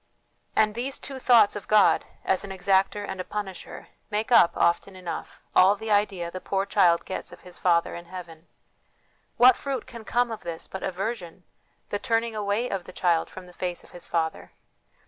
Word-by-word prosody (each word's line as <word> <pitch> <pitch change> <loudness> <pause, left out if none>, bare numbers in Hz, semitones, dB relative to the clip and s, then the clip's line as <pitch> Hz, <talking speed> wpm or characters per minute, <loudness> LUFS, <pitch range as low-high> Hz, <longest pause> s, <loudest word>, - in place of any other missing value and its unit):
And 215 -1 +3
these 255 +4 -3
two 270 -1 -7
thoughts 235 -5 +5
of 205 - -7
God, 215 -1 +5 0.2
as 190 - +1
an 200 - -7
exactor 195 +2 +1
and 185 - -4
a - - -4
punisher, 195 -1 -7 0.2
make 215 +2 -2
up, 175 -8 +6
often 170 +3 +1
enough, 180 -2 -7
all 190 +2 +6
the 220 +1 -5
idea 195 -4 +1
the 185 - -7
poor 195 0 -1
child 175 -3 +3
gets 190 - -6
of - - -13
his 180 -1 -12
Father 170 -2 +2
in 170 - -8
heaven. 170 -2 -10 0.9
What 250 0 +8
fruit 270 -3 -4
can 235 -3 -10
come 240 +2 +1
of 225 - -6
this 170 -1 -6
but 190 - -7
aversion, 190 -2 -4 0.5
the 205 - -2
turning 230 -1 0
away 210 +3 0
of 190 -6 -4
the - - -10
child 170 -2 +1
from 185 - -10
the 180 - -15
face 180 -1 -4
of - - -18
his 175 - -9
Father? 160 -1 -2
195 Hz, 190 wpm, -26 LUFS, 180-220 Hz, 0.9 s, What